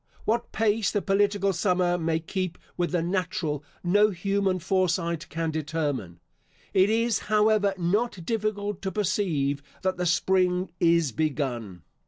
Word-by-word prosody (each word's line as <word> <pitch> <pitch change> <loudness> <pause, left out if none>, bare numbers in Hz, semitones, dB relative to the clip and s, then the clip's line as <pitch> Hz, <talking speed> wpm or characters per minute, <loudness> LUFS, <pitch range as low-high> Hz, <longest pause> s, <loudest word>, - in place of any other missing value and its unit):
What 235 +2 0
pace 220 -2 +1
the 205 - 0
political 200 0 +1
summer 180 0 +1
may 165 -2 0
keep 180 +1 -3 0.2
with 175 -1 -1
the 175 -2 +1
natural, 170 -5 -2 0.2
no 205 +4 +4
human 195 0 0
foresight 180 -2 0
can 165 +1 -2
determine. 145 - -3 0.5
It 190 +2 +4
is, 230 +1 +2
however, 210 -2 +3
not 185 +1 0
difficult 210 -2 -2
to 190 -1 -2
perceive 165 -9 0 0.2
that 185 -1 0
the 180 0 0
spring 180 +1 +2
is 170 -4 +3
begun. 125 - -2
180 Hz, 135 wpm, -26 LUFS, 165-205 Hz, 0.5 s, no